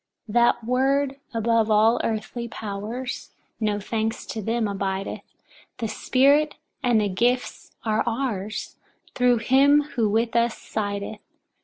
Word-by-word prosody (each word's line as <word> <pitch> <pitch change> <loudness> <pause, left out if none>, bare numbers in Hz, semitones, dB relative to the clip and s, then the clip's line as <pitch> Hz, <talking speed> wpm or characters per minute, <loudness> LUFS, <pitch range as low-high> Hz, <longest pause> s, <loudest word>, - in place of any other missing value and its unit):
4. 210 - -9
That 240 -1 +3
word 270 +3 +1
above 230 -1 +1
all 220 +2 +4
earthly 225 +2 -3
powers, 220 +4 -5 0.3
no 210 -2 0
thanks 220 +2 -2
to 220 - -5
them, 225 +1 0
abideth; 195 -1 -3 0.6
the 230 - -2
Spirit 280 +7 +3 0.3
and 245 -4 +3
the 210 - +1
gifts 240 +6 -1
are 220 0 +2
ours, 225 -4 -3 0.4
thru 250 -1 +3
him 275 +5 +4
who 225 -3 +2
with 225 +2 0
us 235 -1 +2
sideth. 205 0 -4
230 Hz, 130 wpm, -24 LUFS, 215-250 Hz, 0.6 s, all